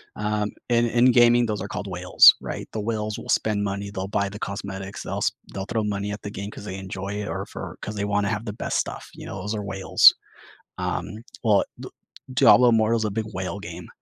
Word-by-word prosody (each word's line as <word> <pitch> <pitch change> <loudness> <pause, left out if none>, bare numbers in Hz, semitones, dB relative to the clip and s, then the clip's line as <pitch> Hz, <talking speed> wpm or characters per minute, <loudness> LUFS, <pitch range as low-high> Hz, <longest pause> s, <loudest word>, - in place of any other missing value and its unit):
Um, 105 0 -1 0.2
in 120 -1 +3
in 120 +2 +4
gaming, 120 0 +5
those 105 -3 -3
are 100 - -4
called 100 - -5
whales, 90 -1 +7
right? - - -6
The 110 - -2
whales 110 -1 -3
will - - -10
spend 105 -2 +1
money, 100 0 -3
they'll 95 -1 -4
buy 100 0 -1
the 100 +1 -9
cosmetics, 95 -1 -6
they'll - - -4
s - - +1 0.2
they'll 95 -1 -4
throw 110 0 -1
money 105 -1 -2
at 105 - -7
the 100 - -5
game 100 +1 -6
'cause 105 - -10
they 95 -2 -5
enjoy 95 0 -6
it - - -5
or - - -3
for - - -8
'cause 105 - -4
they 100 - -2
wanna 100 -1 0
have 105 +2 -3
the 105 - -4
best - - -2
stuff, - - -4
you - - -10
know? 95 - -6
Those 105 +3 -3
are 105 -1 -3
whales. 95 -1 +6 0.7
Um, 110 +4 -4 0.2
well, 105 -4 +4 0.2
D - - -7 0.4
Diablo 125 0 +6
Immortal's 115 0 +2
a 105 - -1
big 110 +2 -2
whale 95 +2 -4
game 90 -2 -8
105 Hz, 225 wpm, -24 LUFS, 100-110 Hz, 0.7 s, whales